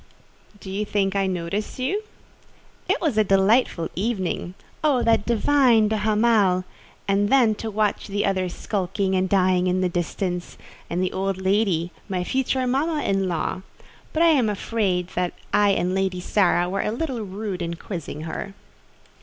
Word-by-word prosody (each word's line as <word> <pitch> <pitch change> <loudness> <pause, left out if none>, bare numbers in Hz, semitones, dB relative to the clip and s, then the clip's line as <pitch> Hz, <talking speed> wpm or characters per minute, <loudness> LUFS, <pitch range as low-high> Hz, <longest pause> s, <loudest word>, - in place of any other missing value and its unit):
"Do 190 - -8
you 200 +2 -1
think 200 -2 0
I 195 -1 +1
noticed 185 +3 -3
you?" 315 +12 -1 0.9
"It - - +2
was 290 -10 +1
a - - +5
delightful 195 -2 +3
evening. 190 -3 -2 0.3
Oh, 280 -5 +3
that 225 -2 +2
divine 235 -2 +4
de 220 - 0
Hamal! 210 -3 +3 0.4
And 200 +1 +2
then 245 -4 +4
to 225 - -3
watch 210 -1 -1
the 205 0 -1
other 185 -2 0
sulking 190 +1 -2
and 185 0 +1
dying 185 -2 +3
in 185 +1 +1
the 185 - +1
distance; 175 +1 -3 0.3
and 175 +2 -1
the 185 - -1
old 195 0 -1
lady—my 190 -2 0
future 260 +4 0
mamma 295 +5 0
in 195 -1 +1
law! 175 +2 -2 0.5
But 320 - +2
I 335 - +6
am 265 -9 +3
afraid 195 -4 -1 0.4
I 205 0 +4
and 185 -2 +1
Lady 190 -1 0
Sara 180 -1 +2
were 195 +2 -1
a - - -1
little 250 -1 -3
rude 195 -2 -5
in 170 0 -3
quizzing 165 -4 -6
her." 165 +5 -6
195 Hz, 160 wpm, -23 LUFS, 185-220 Hz, 0.9 s, I